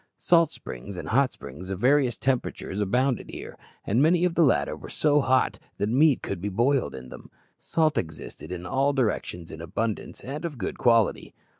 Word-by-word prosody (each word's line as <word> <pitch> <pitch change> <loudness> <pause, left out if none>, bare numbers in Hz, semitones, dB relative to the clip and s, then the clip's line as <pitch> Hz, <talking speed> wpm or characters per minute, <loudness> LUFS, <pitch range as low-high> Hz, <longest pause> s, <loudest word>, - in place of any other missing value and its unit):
Salt 170 -3 +4
springs 75 +11 -8
and - - -6
hot 135 +3 +3
springs 90 +8 -10
of 95 -1 -3
various 130 -1 +3
temperatures 125 -6 -2
abounded 125 +5 0
here, - - -8 0.3
and 115 +6 +2
many 170 +3 +4
of 180 - +1
the 170 - +2
latter 140 -7 +3
were - - -11
so 150 -1 +3
hot 130 -1 +2 0.2
that 100 - -1
meat 140 +3 +4
could 95 -3 -4
be 105 - -2
boiled 120 - +1
in 65 -1 -9
them. - - -11 0.3
Salt 155 -3 +1
existed 80 0 -8
in 90 -1 -5
all 135 +8 +1
directions 105 -9 -2
in 80 - -8
abundance 105 +6 -4
and 145 +5 -5
of 160 -5 -4
good 100 - -4
quality. 115 -3 +2
125 Hz, 185 wpm, -26 LUFS, 95-145 Hz, 0.3 s, Salt